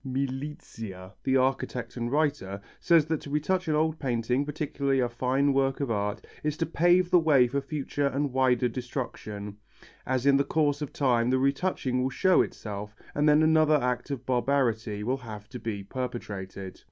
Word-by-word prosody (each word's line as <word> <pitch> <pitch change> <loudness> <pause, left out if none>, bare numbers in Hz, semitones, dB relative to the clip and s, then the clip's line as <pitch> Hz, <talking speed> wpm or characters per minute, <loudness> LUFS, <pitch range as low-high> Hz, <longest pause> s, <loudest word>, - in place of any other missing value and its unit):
Milizia, 130 -8 -5
the 135 0 +3
architect 130 -1 -1
and 120 -1 -3
writer, 140 -10 0 0.2
says 165 -3 +4
that 160 -1 -2
to - - -9
retouch 170 +6 0
an 155 - +2
old 160 +1 +1
painting, 125 0 0
particularly 140 -2 -1
a 125 - +2
fine 130 +4 +1
work 135 0 +1
of 140 -5 -1
art, 105 -1 -2 0.2
is 150 0 -1
to 165 - 0
pave 175 +2 +3
the 180 - +7
way 145 -6 +5
for 140 +3 -1
future 145 -1 -2
and 140 0 -1
wider 130 -2 +3
destruction, 110 -5 -5 0.5
as 130 0 0
in 140 -1 +6
the 140 - +3
course 145 -1 +1
of 145 - -4
time 120 -4 +2
the 130 - +3
retouching 135 -1 0
will 130 - +1
show 185 +7 +4
itself 105 0 -5 0.2
and 150 +1 +3
then 150 +1 +5
another 155 -1 +5
act 125 -2 -1
of 140 -4 -4
barbarity 120 -5 0
will 125 +4 0
have 110 -5 -9
to 125 - -7
be 105 -4 -4
perpetrated. 100 -5 -6
130 Hz, 175 wpm, -28 LUFS, 120-150 Hz, 0.5 s, the